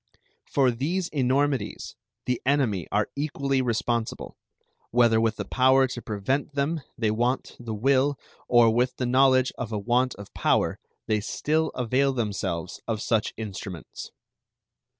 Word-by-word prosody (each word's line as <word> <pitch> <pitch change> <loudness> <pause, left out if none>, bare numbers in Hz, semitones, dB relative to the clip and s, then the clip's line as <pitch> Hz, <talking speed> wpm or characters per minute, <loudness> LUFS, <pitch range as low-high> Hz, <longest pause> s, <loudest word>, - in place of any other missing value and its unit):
For 135 -3 +3
these 165 +9 -2
enormities 140 0 0 0.3
the 125 -1 -1
enemy 125 - +1
are 105 +1 0
equally 140 -2 0
responsible, 115 -1 -2 0.5
whether 115 -2 +4
with 115 -1 +1
the - - -5
power 130 +1 +4
to 120 - -5
prevent 125 +8 -2
them 150 +3 0 0.2
they 110 -2 +1
want 120 +4 -1
the 115 -2 -5
will 135 +4 +2 0.3
or 120 -2 +5
with 125 +2 +1
the 125 - -2
knowledge 130 +1 +4
of 115 -3 -4
a 110 - -1
want 120 +4 +1
of 100 - -11
power - - +1 0.3
they 110 -1 +1
still 155 +9 0
avail 130 +3 +1
themselves 95 -7 -3
of 110 -2 -1
such 110 -1 0
instruments. 95 -6 -7
125 Hz, 140 wpm, -26 LUFS, 110-135 Hz, 0.5 s, or